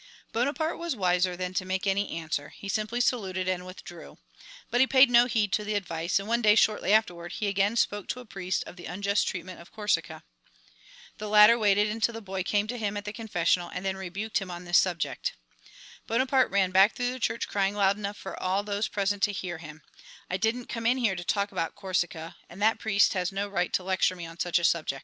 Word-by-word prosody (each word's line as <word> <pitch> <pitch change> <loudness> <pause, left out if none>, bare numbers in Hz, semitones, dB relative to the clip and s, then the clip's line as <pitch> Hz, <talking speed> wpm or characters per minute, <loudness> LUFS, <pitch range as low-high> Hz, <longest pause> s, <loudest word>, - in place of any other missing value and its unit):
Bonaparte 285 +7 -1
was 335 -4 -2
wiser 180 -2 +1
than 180 0 -4
to 185 - -1
make 185 +1 -2
any 200 +1 +1
answer, 155 -3 -4
he 200 - -10
simply 215 +4 -2
saluted 190 -7 0
and 185 -1 -2
withdrew. 175 -2 -11 0.5
But 245 - +3
he 265 - +5
paid 260 -1 +6
no 240 0 +6
heed 215 -5 0
to 210 - +1
the 210 0 -2
advice, 170 -2 -1
and 195 +1 -3
one 235 +1 +1
day 210 -2 +5
shortly 215 -2 +2
afterward 175 -6 +1
he 215 - -3
again 200 +2 +1
spoke 205 -4 0
to 250 - -3
a 250 - -10
priest 190 -4 -3
of 180 - -11
the 175 - -9
unjust 200 +3 0
treatment 185 -1 -5
of 170 - -16
Corsica. 210 -1 -2 1.0
The 210 0 -5
latter 210 +2 +8
waited 210 -2 +3
until 225 +2 0
the 225 - -6
boy 190 -2 -4
came 205 +3 +1
to 245 0 -4
him 205 -1 -2
at 205 - -6
the 210 - -5
confessional 180 -5 0
and 180 - -6
then 190 0 -1
rebuked 190 +4 -3
him 195 -2 -7
on 175 0 -7
this 175 0 +5
subject. 175 -4 -1 0.7
Bonaparte 260 +3 +2
ran 190 -2 +2
back 195 +3 +5
through 245 -1 -1
the 255 - -6
church 230 0 -1
crying 200 0 0
loud 200 -1 +3
enough 205 0 -5
for 190 - -7
all 190 +2 0
those 205 +1 -1
present 200 0 -1
to 205 - +3
hear 180 -4 -5
him, 155 -1 -11 0.5
"I 185 - 0
didn't 225 +5 -1
come 230 -1 -3
in 250 +2 +3
here 225 -7 +1
to 175 - -5
talk 200 +3 0
about 165 - -3
Corsica, 175 -4 -3
and 175 - -12
that 220 +2 +2
priest 205 -3 +3
has 180 -1 -1
no 200 +1 -2
right 180 -3 -1
to 185 - +1
lecture 185 0 +1
me 175 -2 -7
on 165 +1 -11
such 175 0 +1
a 170 - -1
subject!" 155 -5 +1
200 Hz, 230 wpm, -27 LUFS, 180-215 Hz, 1.0 s, latter